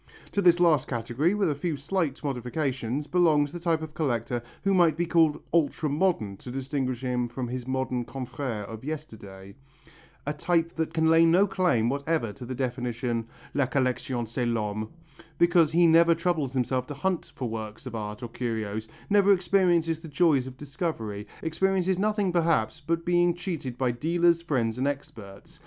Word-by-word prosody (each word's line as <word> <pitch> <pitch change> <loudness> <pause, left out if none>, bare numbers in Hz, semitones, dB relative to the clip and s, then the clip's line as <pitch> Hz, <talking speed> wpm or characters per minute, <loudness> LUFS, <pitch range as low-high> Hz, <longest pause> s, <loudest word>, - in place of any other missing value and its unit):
To 200 - 0
this 175 -2 +5
last 165 -6 +4
category, 125 - 0
with 195 -6 +1
a - - +1
few 150 +2 -3
slight 155 -1 -2
modifications, 130 0 -2
belongs 150 -4 +3
the 175 - -6
type 165 -2 0
of 155 -1 -7
collector 120 -6 -1 0.2
who 195 0 +2
might 170 -4 +4
be 175 - +1
called 160 -3 +2
ultra 155 -2 +1
modern 145 - 0
to 125 - -10
distinguish 130 -1 -2
him 125 -1 -1
from 125 +1 -5
his 125 0 -5
modern 130 -2 -1
confrères 125 -4 -5
of 110 +2 -9
yesterday, 100 -11 -8 0.7
a 145 - -1
type 165 +2 0
that 160 -1 -1
can 160 -1 +1
lay 165 +1 +6
no 175 +4 +5
claim 180 - +1
whatever 140 -3 -1
to 120 +5 -10
the 130 - -4
definition 120 -2 -2 0.3
"La 140 -2 +1
collection 130 -2 -1
c'est 120 +3 -3
l'homme," 110 -2 -2 0.5
because 170 -3 +4
he 170 +1 +4
never 165 +1 +6
troubles 160 -6 -1
himself 130 0 0
to 145 - -6
hunt 180 +4 -2
for 125 - -3
works 110 +2 -6
of 130 - -6
art 105 0 -5
or - - -3
curios, 110 -3 -3 0.2
never 200 -1 +4
experiences 175 -3 +2
the 165 - -10
joys 145 -4 +2
of 130 -1 -9
discovery, 135 - -4 0.2
experiences 190 +2 +1
nothing 205 -2 +1
perhaps, 165 -4 +1
but 165 +2 -2
being 175 0 +3
cheated 165 -9 -5
by 125 -1 +1
dealers, 170 +6 +2
friends 125 -8 -1
and 135 - +1
experts. 140 +1 -7
145 Hz, 175 wpm, -27 LUFS, 120-170 Hz, 0.7 s, lay